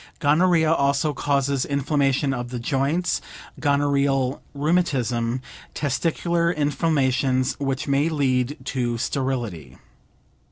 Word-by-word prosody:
Gonorrhea 160 +1 +3
also 140 +1 +1
causes 140 -1 0
inflammation 140 -1 +1
of 120 -1 -4
the 125 - -4
joints, 140 +8 0 0.4
gonorrheal 140 -2 +1
rheumatism, 130 -7 0 0.3
testicular 170 +4 0
inflammations 135 -4 +1
which 135 0 -2
may 140 +3 +2
lead 135 -2 0
to 120 -3 -1
sterility. 115 - -3
140 Hz, 90 wpm, -23 LUFS, 130-150 Hz, 0.4 s, Gonorrhea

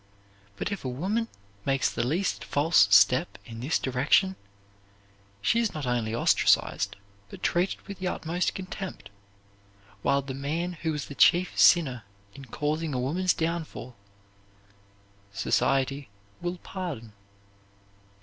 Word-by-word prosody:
But, 205 - -3
if 200 - -4
a 130 - -2
woman 195 - -1 0.4
makes 135 +2 +1
the - - -2
least 165 +10 -1
false 155 +4 +4
step 130 +7 +5
in 115 -2 -9
this 135 +7 +1
direction, 140 +9 +2 1.1
she 230 - +3
is 230 -6 0
not 150 -3 -4
only 120 -3 -1
ostracized - - +2 0.3
but - - -11
treated 175 +3 +1
with 200 -2 -8
the 185 - -2
utmost 175 +1 -1
contempt, 190 - -7 0.9
while 140 +4 +2
the 135 0 -6
man 155 +6 -2
who 160 -1 -3
was 150 -1 -3
the - - -9
chief 175 +5 +4
sinner 135 -9 +5 0.3
in 140 0 -11
causing 150 +3 -2
a - - 0
woman's 175 +9 +1
downfall, 160 -6 -4 1.4
society 135 +5 0 0.3
will 175 +1 -3
pardon. 165 - -6
155 Hz, 130 wpm, -27 LUFS, 130-180 Hz, 1.4 s, step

